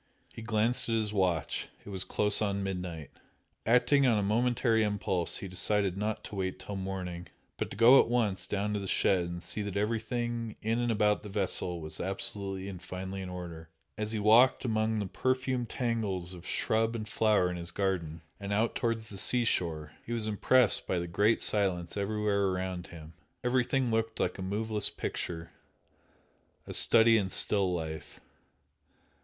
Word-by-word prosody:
He - - -9
glanced 115 +2 0
at 115 - +1
his 110 -2 -1
watch, 90 -7 0 0.2
it - - -9
was 95 -2 -3
close 105 0 +2
on 100 -2 -1
midnight. 90 -5 -5 0.6
Acting 125 +4 +4
on 115 -3 +3
a 105 - 0
momentary 115 +2 +2
impulse 100 -4 0
he 100 - -5
decided 95 +1 +1
not 105 +2 -3
to - - -9
wait 95 -1 -2
till 100 - -7
morning, 95 -2 -5 0.3
but - - -3
to - - -9
go 120 +4 +8
at - - +4
once 115 -5 0
down 105 +1 -1
to 105 - -1
the 100 - -5
shed 90 -1 +2
and 85 0 -6
see 105 - -3
that 100 -1 -4
everything 115 +1 -2
in 115 +2 0
and 120 -1 0
about 105 -1 +2
the 105 - -9
vessel 95 -3 0
was 80 -1 -6
absolutely 95 0 -2
and 95 -3 -7
finally 95 +1 -6
in 95 - -6
order. 85 -3 -8 0.3
As 105 0 -3
he 110 - -2
walked 115 +6 +5
among 110 -1 0
the 105 - -1
perfumed 130 +3 -1
tangles 105 -8 -2
of 90 0 -11
shrub 115 +1 0
and 110 -1 -5
flower 105 -3 +2
in 90 - -5
his 85 0 -6
garden, 85 -5 -2 0.2
and 100 0 -6
out 110 +3 +1
towards 115 -2 -2
the 100 - -6
sea 120 +3 +4
shore 80 -7 -1
he 120 - -5
was 115 -2 -1
impressed 110 +3 +3
by 95 - 0
the 85 - -2
great 105 +6 +2
silence 95 -5 +1
everywhere 100 0 0
around 90 -1 -3
him. 80 -1 -12 0.3
Everything 125 0 +1
looked 115 0 -1
like 90 - -1
a - - -4
moveless 105 +3 -1
picture 85 0 -5 1.1
a - - -7
study 115 -1 +6
in 95 -2 -2
still 95 -1 +3
life. 80 -2 -5
105 Hz, 180 wpm, -30 LUFS, 95-115 Hz, 1.1 s, go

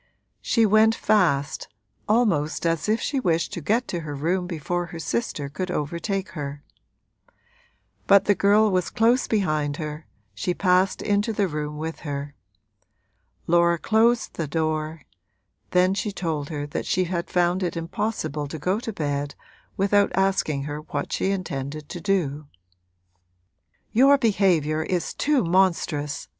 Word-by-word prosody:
She 230 -2 +3
went 215 +2 +5
fast, 160 -10 +1 0.4
almost 190 -10 +1
as 165 +3 0
if 220 +2 +2
she 280 - -1
wished 170 -5 0
to 175 - -4
get 225 - +1
to 175 - -2
her 150 -3 -6
room 175 +5 -1
before 175 +1 -3
her 170 - -8
sister 160 -5 -2
could 165 +6 -4
overtake 180 +5 -2
her. 145 -2 -6 1.4
But 200 -1 +6
the 205 - +4
girl 205 +2 +4
was 185 -2 0
close 240 +2 +2
behind 155 -9 0
her, 155 0 -6 0.3
she 175 - -2
passed 185 0 +2
into 205 +2 +1
the 205 -2 +1
room 150 -2 -4
with 160 +1 -5
her. 145 -1 -5 1.1
Laura 170 0 +3
closed 225 +6 +2
the 165 - -3
door; 155 0 -2 0.7
then 180 +1 +3
she 210 +1 -2
told 160 -7 -3
her 145 -3 -4
that 145 - -4
she 185 - +2
had 170 -1 -3
found 180 +1 +1
it 175 -2 -2
impossible 165 -4 -3
to 160 - -6
go 185 +7 0
to 230 - -5
bed 145 -5 -3 0.4
without 200 +1 +3
asking 190 -7 +1
her 145 +1 -4
what 150 -2 -4
she 190 - 0
intended 150 -6 -4
to 175 - -6
do. 155 -7 -1 1.4
'Your 275 +5 +6
behaviour 185 - +2
is 175 +2 -2
too 290 -5 +1
monstrous!' 170 -5 +1
175 Hz, 145 wpm, -24 LUFS, 150-200 Hz, 1.4 s, But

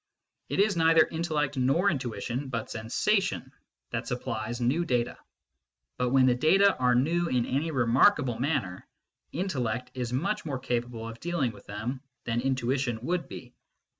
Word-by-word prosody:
It - - -1
is 205 0 +3
neither 165 -1 +5
intellect 155 -4 -1
nor 135 +10 +3
intuition, 125 -1 -3
but 115 -3 -4
sensation, 130 - 0 0.4
that 115 +1 -3
supplies 120 -2 -3
new 130 +8 +1
data; 125 -7 0 0.8
but 125 - +1
when 130 0 +5
the 125 - +5
data 190 +10 +4
are 125 -1 +3
new 170 +7 +2
in 125 -5 +1
any 145 +5 -1
remarkable 130 - +3
manner, 125 - -2 0.4
intellect 125 - -2
is 125 -2 -3
much 195 +12 -1
more 145 -4 -3
capable 120 -2 -3
of 115 0 -8
dealing 165 -7 -1
with 100 -2 -16
them 120 +6 -4 0.2
than 115 0 -1
intuition 130 -1 0
would 170 -1 -1
be. 125 -1 -9
130 Hz, 150 wpm, -28 LUFS, 120-160 Hz, 0.8 s, neither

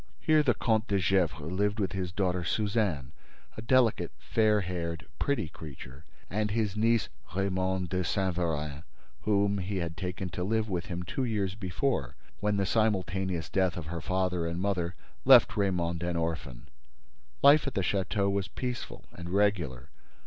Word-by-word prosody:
Here 155 -1 +4
the 125 -6 +2
Comte 110 0 +1
de 100 - +1
Gesvres 85 -4 +1
lived 105 +3 0
with 95 -3 0
his 95 -2 -3
daughter 90 -1 0
Suzanne, 100 - 0 0.4
a - - -6
delicate, 120 -1 +3
fair 110 -2 +2
haired, 85 -5 -4
pretty 140 - 0
creature, 70 -2 -10 0.2
and 105 +2 -1
his 105 -2 0
niece 115 +1 +2 0.3
Raymonde 95 -1 0
de 90 +1 0
Saint 95 0 0
Véran, 75 -4 -2 0.4
whom 100 -1 +2
he 95 +2 -3
had 85 -2 -3
taken 90 +2 -4
to 90 +1 -4
live 110 +3 0
with 90 -4 -3
him 90 0 -4
two 130 +9 -3
years 105 -6 0
before, 90 - -2 0.2
when 105 0 +1
the 100 - +1
simultaneous 95 -5 0
death 95 -2 +1
of 85 - -5
her 85 +1 -4
father 90 0 0
and 85 +1 -3
mother 90 -3 -1 0.3
left - - +7
Raymonde 90 -4 0
an 85 0 -1
orphan. 80 -7 -3 0.8
Life 145 +1 +7
at 140 - -3
the 95 - +2
château 100 +1 0
was 100 -1 -1
peaceful 125 -2 -5
and 85 0 -8
regular. 90 -10 0
95 Hz, 165 wpm, -29 LUFS, 85-105 Hz, 0.8 s, left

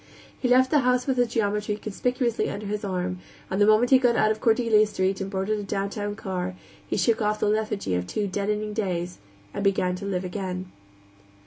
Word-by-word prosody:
He 255 - 0
left 255 +1 +4
the 300 - +5
house 250 -1 +2
with 265 -2 0
his 245 -1 +3
geometry 210 -2 -1
conspicuously 235 +3 -1
under 210 - -5
his 210 +1 -3
arm, 180 -2 -2 0.3
and 190 +2 0
the 205 - +6
moment 215 +4 +4
he 260 - +8
got 245 -2 +3
out 215 - +3
of 220 - -3
Cordelia 225 -2 +4
Street 190 -1 -1
and 195 - -3
boarded 195 +2 -1
a - - -4
downtown 200 +1 -3
car, 180 - -4 0.3
he - - -1
shook 230 -1 +2
off 210 0 0
the - - +1
lethargy 210 - -1
of 90 0 -1
two 210 - -2
deadening 210 +2 -2
days 180 -4 -2 0.3
and - - -3
began 190 -2 +2
to 200 - -7
live 185 -2 -2
again. 185 -1 -4
210 Hz, 205 wpm, -25 LUFS, 190-220 Hz, 0.3 s, he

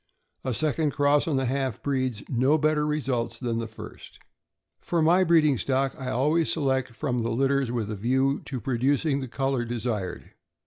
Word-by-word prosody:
A 130 -3 -2
second 155 +1 0
cross 145 +1 +3
on 155 - +1
the 135 0 +1
half 130 -1 -2
breeds; 130 -6 -1
no 130 +4 +2
better 150 0 +1
results 130 -6 -1
than 115 -2 -2
the 115 - -3
first. 110 - -11 0.6
For 170 - -1
my 170 +4 +4
breeding 155 -7 +4
stock, 135 0 0
I 130 -1 -5
always 150 +6 +1
select 130 -5 0
from 125 -2 -1
the 115 - -1
litters 135 +1 +1
with 115 -3 -2
a - - -3
view 130 +6 +1
to 130 -3 -4
producing 135 +4 +1
the 130 - -5
color 135 0 -1
desired. 115 -6 -4
135 Hz, 175 wpm, -26 LUFS, 120-145 Hz, 0.6 s, my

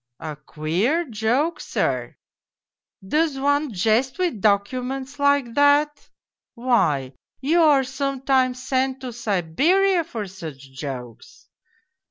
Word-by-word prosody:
A 155 -2 -6
queer 170 - -1
joke, 245 +8 0
sir! - - -2 0.9
Does 305 +4 +1
one 285 0 +1
jest 225 +7 +1
with 350 - -1
docu 205 +5 +2
ments 270 +2 -6
like 285 -4 +2
that? 285 +2 +3 0.5
Why, 180 - +1 0.3
you 315 +6 +2
are 295 -4 +5
sometimes 265 -1 0
sent 260 0 0
to 255 -2 -6
Siberia 275 - +2
for 225 -8 -5
such 155 -8 -10
jokes. 130 -4 -8
255 Hz, 110 wpm, -23 LUFS, 195-285 Hz, 0.9 s, are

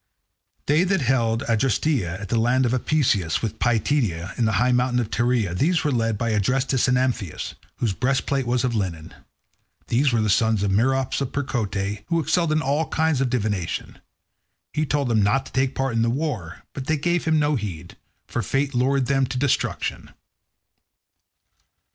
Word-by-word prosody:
They 150 +4 +3
that 190 -2 +1
held 115 -3 +1
Adresteia 115 - 0
and 100 - -6
the 115 - 0
land 125 +3 +2
of 120 - 0
Apaesus, 120 - +1
with 110 0 -3
Pityeia, 110 - 0
and 115 - +1
the 110 - 0
high 125 +4 +3
mountain 125 0 +2
of 115 -2 -3
Tereia—these 120 - +1
were 150 - +1
led 115 -3 0
by 115 +1 -1
Adrestus 125 +5 +1
and 125 0 +3
Amphius, 125 -10 -2 0.2
whose 110 -5 -1
breastplate 135 +2 0
was 125 +1 +1
of 125 -2 0
linen. 90 -7 -3 0.8
These 130 +3 +2
were 115 -2 +1
the 110 - +1
sons 110 0 +2
of 100 - +1
Merops 130 +7 +1
of 135 - -2
Percote, 105 -7 -2
who 165 - +1
excelled 165 +1 +1
in 155 +1 +1
all 145 +4 0
kinds 160 -3 +1
of 135 - +1
divination. 105 -8 -2 0.7
He 155 0 0
told 145 -1 0
them 115 -3 +2
not 105 +7 +2
to - - -12
take 130 0 0
part 135 -2 -1
in 115 - +1
the 115 - +2
war, 120 - -3
but 130 -2 -6
they 155 - +1
gave 175 +4 0
him 160 -1 +3
no 150 0 +2
heed, 90 - -6 0.3
for 120 - -3
fate 135 +6 -1
lured 130 +2 +2
them 135 0 +1
to 125 - -4
destruction. 135 0 -1
125 Hz, 180 wpm, -23 LUFS, 110-140 Hz, 0.8 s, They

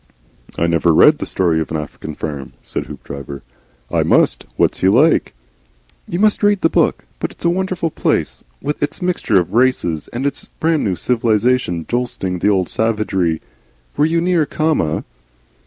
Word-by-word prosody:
"I 85 - +1
never 85 -1 +2
read 150 - +6
'The - - -4
Story 85 -3 +1
of 80 - -4
an 80 - -2
African 75 0 -7
Farm,'" 70 -5 -6
said - - -5
Hoopdriver. 70 0 -8 0.5
"I - - +2
must. - - +2
What's - - +1
he 95 - +3
like?" 130 - +3 0.7
"You 175 - -3
must 210 +2 +2
read 205 -2 +3
the 165 - +3
book. - - +1
But - - -2
it's - - -11
a 170 - +4
wonderful 185 -2 -1
place, - - -1 0.2
with 150 +1 -3
its 145 +1 -2
mixture 170 - +2
of 90 - -3
races, 115 - +1
and 125 +4 -4
its 140 - -2
brand 160 -1 +1
new 95 -4 0
civilisation 115 -6 +1
jostling 115 -7 -2
the 100 - +2
old 95 -3 +2
savagery. 100 -7 0 0.5
Were 150 - +3
you 165 +1 +1
near 170 -4 +2
Khama?" 155 - 0
115 Hz, 170 wpm, -18 LUFS, -, 0.7 s, read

